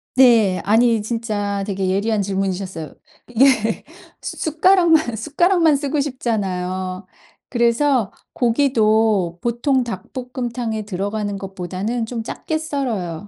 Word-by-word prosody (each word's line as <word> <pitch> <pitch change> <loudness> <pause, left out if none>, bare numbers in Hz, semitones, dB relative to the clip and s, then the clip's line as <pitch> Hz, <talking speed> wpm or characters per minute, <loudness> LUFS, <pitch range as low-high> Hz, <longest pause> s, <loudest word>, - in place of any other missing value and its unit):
네. 230 -8 +5
아니 225 +1 +3
진짜 205 -3 -2
되게 195 -2 -2
예리한 205 +2 +1
질문이셨어요. 190 -4 -3 0.5
예. 235 -5 +3 0.4
수 - - -6
숟가락만, 320 -4 +3
숟가락만 320 - +2
쓰고 285 +1 -1
싶잖아요. 185 -8 -3 0.4
그래서 235 -1 +2 0.2
고기도 220 -8 +2
보통 245 +2 +1
닭볶음탕에 240 0 -4
들어가는 205 +1 -3
것보다는 195 +4 -4
좀 230 0 -4
작게 315 +7 -4
썰어요. 220 - -3
225 Hz, 265 characters per minute, -20 LUFS, 195-255 Hz, 0.5 s, 네